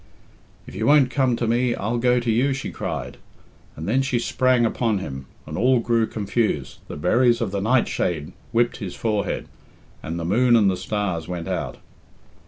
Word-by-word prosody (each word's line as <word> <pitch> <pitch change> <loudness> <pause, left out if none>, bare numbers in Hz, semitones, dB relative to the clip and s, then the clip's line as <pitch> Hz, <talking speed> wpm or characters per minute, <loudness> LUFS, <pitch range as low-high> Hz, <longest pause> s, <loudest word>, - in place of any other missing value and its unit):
"If - - -11
you 110 +4 -2
won't 140 -3 +5
come 130 -2 +2
to 120 - -2
me, 120 +1 +1
I'll 115 +4 -2
go 125 +1 +3
to 120 -1 -1
you!" 130 +5 +2
she 135 - -5
cried; 70 -8 -5 0.6
and 80 +4 -6
then 130 +6 +2
she 130 -2 0
sprang 125 0 +2
upon 115 -1 0
him, 70 -8 -6 0.2
and - - -7
all 125 +3 +4
grew 115 -1 +1
confused, 100 - -2
the - - -7
berries 120 +9 +3
of 115 -5 -2
the 100 -1 -2
nightshade 95 - 0 0.2
whipped 120 +1 +1
his 100 -7 -6
forehead, 105 -3 -2 0.5
and 80 +2 -5
the 85 - -4
moon 120 +7 +4
and 105 -4 +4
the - - -1
stars 95 -3 -3
went 90 -2 -5
out. - - -3
115 Hz, 185 wpm, -23 LUFS, 95-125 Hz, 0.6 s, won't